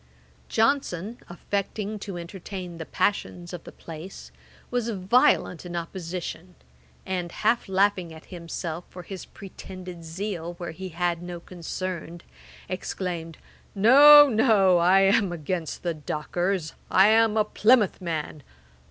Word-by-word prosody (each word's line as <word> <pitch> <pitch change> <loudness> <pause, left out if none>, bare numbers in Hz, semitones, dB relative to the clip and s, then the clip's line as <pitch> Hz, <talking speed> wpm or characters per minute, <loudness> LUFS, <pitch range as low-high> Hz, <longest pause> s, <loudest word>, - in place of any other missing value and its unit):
Johnson, 225 -4 0
affecting 200 +4 -3
to 195 -3 -6
entertain 180 0 -7
the 160 - -6
passions 180 -3 -1
of 175 - -8
the - - -9
place, 165 +3 -10 0.4
was 245 -2 -1
violent 195 -3 +2
in 175 -1 -7
opposition; 175 0 -6 0.5
and, 180 -2 -3
half 220 +1 0
laughing 190 -2 +1
at 160 0 -12
himself 170 -1 -5
for 180 - -10
his 190 +1 -8
pretended 185 -2 -10
zeal 170 0 -5
where 170 -1 -6
he 185 +3 -7
had 175 0 -1
no 175 -1 -6
concern, 175 -1 -6 0.5
exclaimed, 175 -3 -4 0.4
'No, 290 +8 +9
no! 215 -7 +4
I 185 +3 +5
am 195 0 +3
against 170 0 -4
the 170 -2 -1
dockers; 165 +3 -2 0.2
I 195 +2 +6
am 220 0 +4
a 215 - +3
Plymouth 215 -2 +3
man. 155 -3 -4
185 Hz, 125 wpm, -26 LUFS, 170-205 Hz, 0.5 s, No